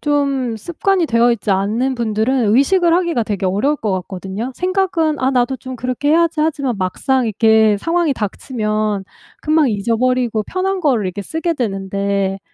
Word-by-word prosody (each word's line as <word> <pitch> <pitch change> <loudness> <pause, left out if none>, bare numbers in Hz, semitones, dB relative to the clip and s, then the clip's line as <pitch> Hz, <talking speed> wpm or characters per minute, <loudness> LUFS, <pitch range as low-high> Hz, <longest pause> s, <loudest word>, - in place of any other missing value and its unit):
좀 275 -5 0
습관이 345 - 0
되어 235 0 +3
있지 215 -2 -3
않는 215 +7 0
분들은 225 0 +1
의식을 340 +6 +3
하기가 340 -9 +1
되게 205 -2 -3
어려울 210 +11 +1
것 215 -7 -3
같거든요. 190 +6 -5
생각은 360 -5 0
'아 260 +1 +1
나도 255 0 +1
좀 255 +2 -8
그렇게 255 +4 -1
해야지.' 335 -1 +2
하지만 280 -6 0
막상 255 +8 0
이렇게 220 0 +3
상황이 330 +2 +1
닥치면 215 -2 -2 0.4
금방 310 -3 +3
잊어버리고 230 +1 0
편한 375 - -2
거를 250 - +1
이렇게 190 +2 -4
쓰게 325 - -2
되는데 195 -3 -2
245 Hz, 360 characters per minute, -18 LUFS, 210-300 Hz, 0.4 s, 되어